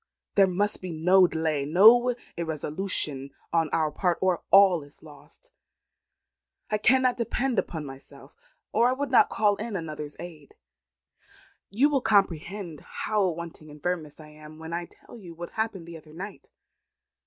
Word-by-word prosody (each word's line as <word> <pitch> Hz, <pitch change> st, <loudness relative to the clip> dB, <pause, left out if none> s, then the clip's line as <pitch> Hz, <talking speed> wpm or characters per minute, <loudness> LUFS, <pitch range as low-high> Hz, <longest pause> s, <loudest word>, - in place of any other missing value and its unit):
There 195 Hz, -1 st, +5 dB
must 200 Hz, +3 st, -1 dB
be 185 Hz, -1 st, -6 dB
no 180 Hz, +4 st, +4 dB
delay, 160 Hz, -4 st, -1 dB
no 225 Hz, -, +6 dB, 0.2 s
irresolution 155 Hz, -3 st, -2 dB, 0.2 s
on 165 Hz, -2 st, +2 dB
our 155 Hz, -1 st, 0 dB
part, 175 Hz, +2 st, 0 dB
or 185 Hz, -2 st, +1 dB
all 195 Hz, -4 st, +6 dB
is 145 Hz, +1 st, -12 dB
lost. 155 Hz, -, -15 dB, 1.2 s
I 215 Hz, -, +1 dB
cannot 255 Hz, +3 st, +3 dB
depend 240 Hz, 0 st, -1 dB
upon 160 Hz, -3 st, -4 dB
myself, 135 Hz, 0 st, -12 dB, 0.4 s
or 240 Hz, +1 st, +3 dB
I -, -, +1 dB
would 280 Hz, 0 st, -4 dB
not 250 Hz, -, +5 dB
call 205 Hz, -2 st, +1 dB
in 220 Hz, -1 st, -5 dB
another's 155 Hz, -4 st, -6 dB
aid. 160 Hz, -4 st, -11 dB, 1.1 s
You 240 Hz, +9 st, +3 dB
will 285 Hz, -3 st, 0 dB
comprehend 195 Hz, -, 0 dB
how 210 Hz, -3 st, -1 dB
wanting 170 Hz, -2 st, -7 dB
in 150 Hz, 0 st, -13 dB
firmness 165 Hz, -3 st, -4 dB
I 155 Hz, -1 st, -12 dB
am, 155 Hz, 0 st, -14 dB
when 160 Hz, +1 st, -8 dB
I 170 Hz, 0 st, -3 dB
tell 240 Hz, -, -16 dB
you 175 Hz, -5 st, -11 dB
what 175 Hz, +1 st, -8 dB
happened 220 Hz, -6 st, -3 dB
the 170 Hz, -1 st, -8 dB
other 155 Hz, -1 st, -16 dB
night. 195 Hz, +4 st, -9 dB
175 Hz, 155 wpm, -26 LUFS, 155-210 Hz, 1.2 s, no